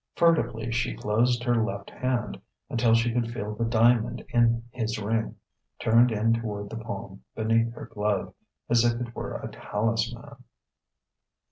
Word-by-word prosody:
Furtively 120 Hz, -9 st, +2 dB
she 120 Hz, +1 st, -1 dB
closed 120 Hz, +3 st, +1 dB
her 120 Hz, -2 st, +2 dB
left 100 Hz, -3 st, -4 dB
hand, 125 Hz, -1 st, -2 dB, 0.3 s
until 115 Hz, -2 st, +3 dB
she 115 Hz, 0 st, +2 dB
could 115 Hz, -1 st, 0 dB
feel 105 Hz, -2 st, -4 dB
the 115 Hz, +2 st, -1 dB
diamond 115 Hz, 0 st, +3 dB
in 115 Hz, -1 st, +3 dB
his 115 Hz, -1 st, -2 dB
ring, 110 Hz, +2 st, -1 dB, 0.4 s
turned 115 Hz, +2 st, +4 dB
in 110 Hz, +1 st, +2 dB
toward 105 Hz, -3 st, -3 dB
the -, -, -5 dB
palm 100 Hz, -3 st, -7 dB
beneath 115 Hz, +1 st, +2 dB
her -, -, -7 dB
glove: 105 Hz, -2 st, -2 dB, 0.3 s
as 120 Hz, 0 st, +4 dB
if 120 Hz, 0 st, +2 dB
it 120 Hz, -1 st, -5 dB
were -, -, -5 dB
a -, -, -6 dB
talisman.... 115 Hz, +5 st, -3 dB
115 Hz, 150 wpm, -27 LUFS, 110-120 Hz, 0.4 s, turned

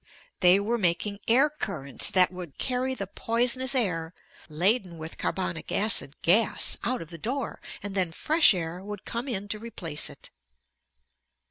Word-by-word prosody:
They 180 Hz, +2 st, +5 dB
were 230 Hz, +4 st, -1 dB
making 200 Hz, +2 st, 0 dB
air 260 Hz, +6 st, +5 dB
currents 195 Hz, -, 0 dB
that 185 Hz, -3 st, +4 dB
would 180 Hz, -5 st, -9 dB
carry 260 Hz, 0 st, -1 dB
the 200 Hz, -, -4 dB
poisonous 245 Hz, +6 st, +1 dB
air, 175 Hz, -8 st, 0 dB, 0.3 s
laden 180 Hz, +3 st, +1 dB
with 160 Hz, +1 st, -9 dB
carbonic 180 Hz, -3 st, -3 dB
acid 205 Hz, -8 st, +2 dB
gas, 210 Hz, +7 st, +4 dB
out 250 Hz, -5 st, -2 dB
of 165 Hz, -, -17 dB
the 170 Hz, -, -10 dB
door, 255 Hz, -, -4 dB, 0.2 s
and 205 Hz, -1 st, -5 dB
then 185 Hz, -4 st, 0 dB
fresh 310 Hz, -, +4 dB
air 170 Hz, +1 st, -5 dB
would 205 Hz, 0 st, -8 dB
come 235 Hz, +3 st, -5 dB
in 205 Hz, -5 st, -3 dB
to 215 Hz, -, -2 dB
replace 175 Hz, -9 st, -2 dB
it. -, -, -11 dB
200 Hz, 155 wpm, -26 LUFS, 175-235 Hz, 0.3 s, They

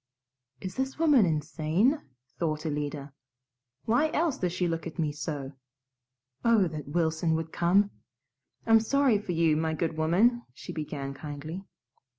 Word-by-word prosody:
"Is 185 Hz, -1 st, -6 dB
this 265 Hz, 0 st, -2 dB
woman 295 Hz, -, +5 dB
insane?" 160 Hz, -, +1 dB, 0.4 s
thought 155 Hz, -2 st, -1 dB
Alida. 145 Hz, -2 st, -3 dB, 0.7 s
"Why 245 Hz, +8 st, +3 dB
else 320 Hz, -3 st, +1 dB
does 180 Hz, -2 st, 0 dB
she 180 Hz, 0 st, 0 dB
look 165 Hz, -1 st, -2 dB
at 165 Hz, -, -9 dB
me 155 Hz, -3 st, 0 dB
so? 145 Hz, -2 st, -5 dB, 0.9 s
Oh, 225 Hz, -5 st, +4 dB
that 155 Hz, -3 st, -7 dB
Wilson 160 Hz, 0 st, +1 dB
would 160 Hz, 0 st, -3 dB
come! 195 Hz, +4 st, +3 dB, 0.7 s
I'm 225 Hz, -1 st, +6 dB
sorry 255 Hz, -1 st, +3 dB
for 195 Hz, -4 st, -4 dB
you, 165 Hz, -2 st, +3 dB
my 160 Hz, 0 st, 0 dB
good 160 Hz, 0 st, -2 dB
woman," 200 Hz, +10 st, +3 dB
she -, -, -8 dB
began 145 Hz, -3 st, -4 dB
kindly. 155 Hz, +6 st, -7 dB
165 Hz, 145 wpm, -28 LUFS, 155-215 Hz, 0.9 s, I'm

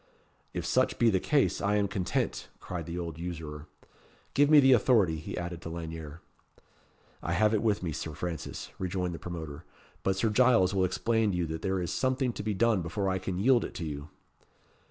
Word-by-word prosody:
"If -, -, -4 dB
such -, -, +2 dB
be 115 Hz, -1 st, +4 dB
the 95 Hz, -, +2 dB
case, 145 Hz, +7 st, +1 dB
I 100 Hz, +1 st, +2 dB
am 100 Hz, -1 st, +2 dB
content," 95 Hz, -2 st, -2 dB
cried 85 Hz, -3 st, -6 dB
the 85 Hz, +1 st, -4 dB
old 85 Hz, -3 st, -5 dB
usurer. 80 Hz, -3 st, -6 dB, 0.7 s
"Give 145 Hz, +1 st, +4 dB
me 155 Hz, -1 st, +8 dB
the 135 Hz, -1 st, +6 dB
authority," 110 Hz, -8 st, +4 dB
he 75 Hz, -, -6 dB
added 85 Hz, -1 st, -4 dB
to 85 Hz, -, -6 dB
Lanyere. 80 Hz, -1 st, -7 dB, 1.0 s
"I 85 Hz, -, -2 dB
have 105 Hz, +5 st, +3 dB
it 110 Hz, -, +2 dB
with 105 Hz, -4 st, +1 dB
me, 85 Hz, -, -1 dB
Sir 75 Hz, +1 st, -5 dB
Francis," 80 Hz, 0 st, -5 dB
rejoined 90 Hz, -1 st, -2 dB
the 85 Hz, -, -6 dB
promoter; 80 Hz, -5 st, -6 dB, 0.4 s
"but 95 Hz, -, +1 dB
Sir 110 Hz, +3 st, +1 dB
Giles 110 Hz, -5 st, +4 dB
will 95 Hz, -1 st, +3 dB
explain 110 Hz, +4 st, +1 dB
to -, -, -1 dB
you 85 Hz, -, 0 dB
that 80 Hz, 0 st, -5 dB
there 95 Hz, -1 st, 0 dB
is 85 Hz, -, -2 dB
something 130 Hz, -1 st, 0 dB
to -, -, -5 dB
be 105 Hz, 0 st, -2 dB
done 110 Hz, -1 st, +3 dB
before 95 Hz, +4 st, -2 dB
I 95 Hz, 0 st, 0 dB
can 95 Hz, -1 st, -3 dB
yield 120 Hz, +5 st, +4 dB
it -, -, -7 dB
to 85 Hz, -, -4 dB
you." 75 Hz, 0 st, -6 dB
90 Hz, 205 wpm, -29 LUFS, 85-110 Hz, 1.0 s, me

